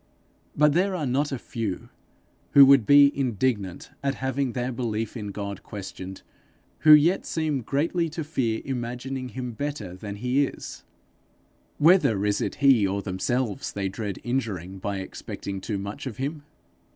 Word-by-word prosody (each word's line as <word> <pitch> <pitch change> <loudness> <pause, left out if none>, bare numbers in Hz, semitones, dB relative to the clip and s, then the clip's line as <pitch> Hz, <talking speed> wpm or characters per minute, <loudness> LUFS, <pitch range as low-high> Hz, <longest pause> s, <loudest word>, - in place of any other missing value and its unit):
But 150 0 +5
there 185 +3 +2
are 160 -5 -2
not 140 +3 0
a 135 - -2
few, 110 -5 -5 0.6
who 140 -1 +10
would 135 -5 +6
be 140 0 +7
indignant 115 -7 -1
at 140 -1 -1
having 130 -1 -1
their 125 0 -2
belief 115 -2 -3
in 105 -3 -5
God 100 -1 -5
questioned, 95 -2 -8 0.6
who 155 - +6
yet 160 +5 +5
seem 155 -4 -1
greatly 165 +7 0
to 160 +1 -4
fear 125 -7 -1
imagining 125 +1 -4
him 125 +1 -5
better 115 -7 -5
than 100 +2 -7
he 125 +6 +1
is: - - -9 0.9
whether 145 - +4
is 105 -1 +1
it - - -2
he 135 -8 +4
or 100 +1 -2
themselves 105 +4 -2
they 100 -1 -2
dread 100 0 -4
injuring 100 -7 -3
by 100 +1 -3
expecting 95 0 -6
too 105 +1 -3
much 100 +8 -6
of 120 - -6
him? 145 +3 -4
125 Hz, 155 wpm, -26 LUFS, 100-140 Hz, 0.9 s, who